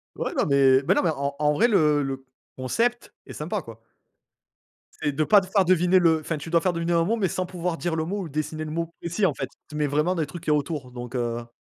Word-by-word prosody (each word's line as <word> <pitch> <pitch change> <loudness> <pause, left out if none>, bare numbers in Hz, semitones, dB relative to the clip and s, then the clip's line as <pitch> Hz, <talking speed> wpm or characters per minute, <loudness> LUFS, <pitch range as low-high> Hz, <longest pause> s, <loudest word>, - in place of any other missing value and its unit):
Ouais, - - -3
non, - - +1
mais 135 -2 +5
mais 190 - +5
non, - - +2
mais 170 - +2
en 140 0 -3
en 150 0 +2
vrai 230 +10 +3
le 150 -9 +3
le 135 -1 -4 0.3
concept 230 - -1
est - - -8
sympa, 175 +7 -3
quoi. 115 -5 -12 1.2
C'est 145 - +1
de 155 - +2
pas 205 +4 +6
te 190 - -7
faire 195 0 +3
deviner 180 +1 +4
le 160 -2 +3
enfin, 160 +1 -3
tu 160 - -8
dois 170 0 +4
faire 180 0 +1
deviner 170 +1 -1
un 165 0 +3
mot 225 +6 0
mais 195 - +1
sans 185 +1 -2
pouvoir 175 -1 -3
dire 170 -1 -2
le 160 - -1
mot 195 +4 -3
ou 165 - -7
dessiner 155 +2 -3
le 155 - -6
mot 165 +1 -2
et 170 - -3
si 195 +5 +1
en 155 - -1
fait, 135 0 -4 0.2
tu 150 - -9
mets 150 0 +1
vraiment 150 +6 +1
des 160 - 0
trucs 170 +2 -10
qu'il 150 - 0
y - - +5
a - - +4
autour, 145 -3 -4
donc 120 -1 -8
heu 120 -1 -2
160 Hz, 280 wpm, -25 LUFS, 140-180 Hz, 1.2 s, pas